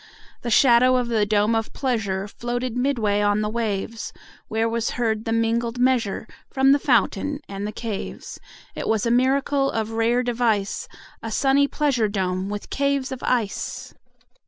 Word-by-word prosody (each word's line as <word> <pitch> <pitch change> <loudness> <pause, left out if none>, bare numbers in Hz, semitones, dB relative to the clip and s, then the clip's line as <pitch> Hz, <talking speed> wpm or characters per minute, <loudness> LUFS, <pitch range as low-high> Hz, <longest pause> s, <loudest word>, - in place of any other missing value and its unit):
30 - - -39
The 240 - -3
shadow 250 +1 +5
of 250 -1 0
the 215 -3 +1
dome 210 +1 +2
of 225 -1 -1
pleasure 205 -7 -1
Floated 240 +2 -4
midway 235 -6 +1
on 205 0 +2
the 210 - -1
waves; 220 -1 -3 0.4
Where 225 +1 0
was 230 0 -1
heard 220 -2 0
the 225 - -2
mingled 230 +1 0
measure 245 -5 +1 0.2
From 265 0 +3
the 285 - +5
fountain 275 +2 +1
and 200 +1 -5
the - - -4
caves. 215 -3 -6 0.3
It - - -5
was 220 -1 +1
a 235 - +1
miracle 275 +2 +2
of 220 0 -2
rare 230 +2 +1
device, 230 -5 0 0.3
35 225 - -5
A - - -8
sunny 275 +4 +3
pleasure 275 -7 +1
dome 190 -1 -2
with 205 0 -6
caves 280 -1 0
of 260 - -5
ice! 230 -5 -2
230 Hz, 170 wpm, -23 LUFS, 210-255 Hz, 0.4 s, shadow